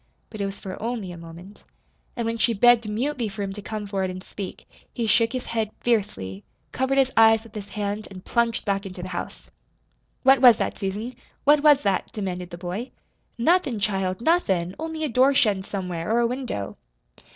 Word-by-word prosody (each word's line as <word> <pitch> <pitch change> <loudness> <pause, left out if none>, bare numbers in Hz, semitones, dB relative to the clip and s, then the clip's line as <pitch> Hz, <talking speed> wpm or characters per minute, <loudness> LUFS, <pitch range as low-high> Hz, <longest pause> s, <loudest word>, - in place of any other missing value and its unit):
But 215 - -6
it 200 - 0
was 195 0 -6
for 185 -1 -7
only 225 -5 -3
a - - -8
moment. 170 +4 -12 0.5
And 235 - -2
when 230 0 -2
she 230 0 +2
begged 235 +1 +5
mutely 245 +2 -1
for 200 +1 -5
him 195 -1 -4
to 205 - -8
come 210 0 -5
forward 195 -2 -1
and 185 0 -7
speak, 195 -2 -8 0.2
he 235 - -2
shook 225 +1 +3
his 255 -1 -3
head 225 -2 -1
fiercely, 195 - -1 0.3
covered 265 +1 0
his 265 -1 +4
eyes 225 0 +6
with 230 -2 -16
his 205 -2 -7
hand, 205 0 -3
and 185 -1 -11
plunged 235 -1 0
back 200 -1 -1
into 185 -1 -8
the 185 - -6
house. 175 -1 -6 0.7
"What 265 -1 +6
was 245 -4 +9
that, - - -2
Susan? 210 +5 -3 0.3
What 295 +1 +5
was 290 -2 +6
that?" 195 -2 0
demanded 180 -4 -4
the 175 - -8
boy. 185 +8 -5 0.5
"Nothin', 270 - +2
child, 195 -1 -1
nothin', 190 - +2
only 320 0 -4
a - - +1
door 260 +2 +4
shuttin' 210 -8 +3
somewhere, 180 -2 -4
or 230 - +3
a - - +3
window." 245 - -3
215 Hz, 195 wpm, -24 LUFS, 190-240 Hz, 0.7 s, was